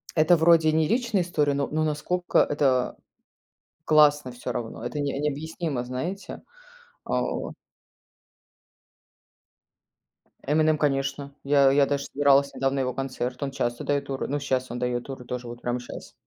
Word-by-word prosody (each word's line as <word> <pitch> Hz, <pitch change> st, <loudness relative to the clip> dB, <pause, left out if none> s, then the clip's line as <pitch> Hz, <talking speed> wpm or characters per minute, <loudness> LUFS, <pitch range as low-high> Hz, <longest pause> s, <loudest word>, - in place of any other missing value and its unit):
это 160 Hz, +2 st, +5 dB
вроде 160 Hz, -1 st, +5 dB
не 160 Hz, 0 st, +2 dB
личная 230 Hz, -2 st, +1 dB
история, 150 Hz, -5 st, 0 dB
но 140 Hz, 0 st, -1 dB
но 155 Hz, +1 st, -1 dB
насколько 155 Hz, +4 st, 0 dB
это 135 Hz, -4 st, +2 dB, 0.9 s
классно 150 Hz, -3 st, +4 dB
всё 125 Hz, 0 st, -6 dB
равно, 115 Hz, 0 st, -5 dB
это 120 Hz, +4 st, -4 dB
не 140 Hz, -1 st, -2 dB
необъяснимо, 150 Hz, -1 st, -3 dB
знаете. 145 Hz, +11 st, -5 dB, 0.6 s
А -, -, -1 dB
вот. -, -, -4 dB, 2.9 s
"Эминем", 155 Hz, 0 st, +3 dB
конечно. 140 Hz, -1 st, -1 dB
Я 140 Hz, -1 st, +5 dB
я 140 Hz, 0 st, +4 dB
даже 140 Hz, 0 st, -2 dB
собиралась 140 Hz, 0 st, +3 dB
недавно 135 Hz, 0 st, 0 dB
на -, -, +1 dB
его 125 Hz, -1 st, -1 dB
концерт, 130 Hz, -1 st, -4 dB
он 140 Hz, -1 st, -2 dB
часто 120 Hz, -3 st, -2 dB
дает 140 Hz, -1 st, 0 dB
туры. 135 Hz, -1 st, -4 dB
Ну, 145 Hz, +2 st, -2 dB
сейчас 130 Hz, -2 st, -1 dB
он 120 Hz, -, -4 dB
дает 125 Hz, 0 st, -1 dB
туры 135 Hz, -2 st, -8 dB
тоже, 125 Hz, 0 st, -5 dB
вот 120 Hz, 0 st, -9 dB
прямо 120 Hz, 0 st, -2 dB
щас. 120 Hz, -, -10 dB
140 Hz, 150 wpm, -25 LUFS, 130-155 Hz, 2.9 s, это